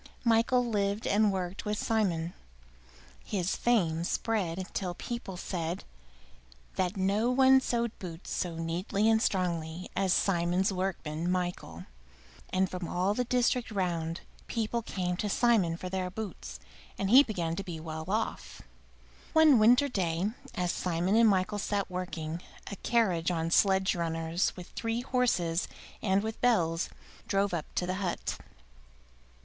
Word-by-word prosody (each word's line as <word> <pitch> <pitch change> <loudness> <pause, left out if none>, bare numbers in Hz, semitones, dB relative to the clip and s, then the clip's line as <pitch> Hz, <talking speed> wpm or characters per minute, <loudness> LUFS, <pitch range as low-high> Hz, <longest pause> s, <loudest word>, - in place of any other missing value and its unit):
Michael 235 +2 +3
lived 205 -2 -1
and 210 0 +3
worked 185 0 -3
with 210 0 -2
Simon. 180 -8 0 0.9
His 185 -2 -1
fame 170 -9 +1
spread 185 -2 -1
till 180 -3 -2
people 235 -5 -5
said 175 -1 -3 0.9
that 185 +2 -1
no 200 +5 +2
one 265 +1 +6
sewed 235 -2 0
boots 175 -2 -8
so 175 -2 -2
neatly 175 +6 -1
and 220 0 +4
strongly 175 -3 -1
as 190 -2 +1
Simon's 180 +1 +2
workman, 175 -3 -2
Michael; 175 - -3 0.6
and 190 +1 +2
from 180 -1 -5
all 185 +4 +1
the 250 +3 -1
district 245 0 +1
round 170 -5 -2 0.3
people 230 0 -1
came 180 -5 -2
to 210 - -2
Simon 200 -7 +3
for 185 - -6
their 185 0 -2
boots, 210 +1 -7 0.4
and 195 0 -1
he 260 +3 +10
began 175 -11 -2
to 195 - -4
be 170 -4 -6
well 160 0 -6
off. 215 +4 -3 0.7
One 315 -6 +7
winter 245 +6 +6
day, 185 -4 -1 0.2
as 180 -4 0
Simon 180 +3 0
and 230 -1 +6
Michael 200 +2 +1
sat 200 -1 -1
working, 170 -2 -4 0.3
a - - -4
carriage 185 -9 +1
on 165 -1 -1
sledge 190 0 +4
runners, 165 +1 0
with 180 - -9
three 230 +1 -2
horses 210 -10 +1 0.3
and 195 -1 +2
with 220 0 -5
bells, 170 -9 +2 0.4
drove 200 -1 +1
up 165 -3 -2
to 180 - 0
the 185 +1 -2
hut. 180 -3 -2
190 Hz, 145 wpm, -30 LUFS, 170-220 Hz, 0.9 s, he